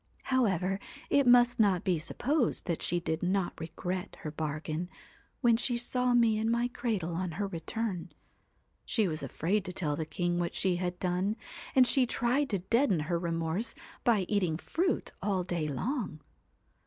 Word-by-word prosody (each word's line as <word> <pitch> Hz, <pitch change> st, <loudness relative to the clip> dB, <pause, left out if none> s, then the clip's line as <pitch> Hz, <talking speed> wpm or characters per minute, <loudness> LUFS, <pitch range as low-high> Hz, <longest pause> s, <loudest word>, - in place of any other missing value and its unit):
' -, -, -31 dB
However, 195 Hz, -6 st, +2 dB, 0.3 s
it 280 Hz, -2 st, +4 dB
must 245 Hz, 0 st, +6 dB
not 200 Hz, -4 st, +4 dB
be 180 Hz, -5 st, +1 dB
supposed 250 Hz, -, 0 dB
that 170 Hz, -3 st, -2 dB
she 175 Hz, -, +1 dB
did 160 Hz, -1 st, -2 dB
not 185 Hz, 0 st, +1 dB
regret 180 Hz, +3 st, -4 dB
her 150 Hz, -, -4 dB
bargain, 155 Hz, +2 st, -3 dB, 0.5 s
when 235 Hz, -3 st, +5 dB
she 245 Hz, 0 st, 0 dB
saw 250 Hz, +1 st, +1 dB
me 225 Hz, -3 st, +4 dB
in 220 Hz, +1 st, +1 dB
my 235 Hz, +1 st, +1 dB
cradle 210 Hz, -9 st, -2 dB
on 175 Hz, 0 st, -2 dB
her 200 Hz, +5 st, -1 dB
return. 195 Hz, +2 st, -3 dB, 0.7 s
She 220 Hz, -4 st, +2 dB
was 155 Hz, -2 st, -3 dB
afraid 195 Hz, +6 st, 0 dB
to 180 Hz, -, -3 dB
tell 155 Hz, -5 st, -1 dB
the 155 Hz, +1 st, -3 dB
king 175 Hz, 0 st, -1 dB
what 175 Hz, -1 st, -2 dB
she 185 Hz, -2 st, +1 dB
had 180 Hz, 0 st, -2 dB
done, 185 Hz, +3 st, 0 dB, 0.4 s
and 260 Hz, -1 st, +7 dB
she 255 Hz, 0 st, +3 dB
tried 250 Hz, +5 st, +1 dB
to 200 Hz, -, +1 dB
deaden 195 Hz, -, +2 dB
her 170 Hz, +3 st, -1 dB
remorse 165 Hz, +5 st, -2 dB, 0.3 s
by 230 Hz, -4 st, +4 dB
eating 180 Hz, -7 st, +1 dB
fruit 350 Hz, -, -1 dB
all 190 Hz, -2 st, 0 dB
day 170 Hz, -3 st, -2 dB
long. 190 Hz, -, -2 dB
190 Hz, 170 wpm, -31 LUFS, 170-235 Hz, 0.7 s, and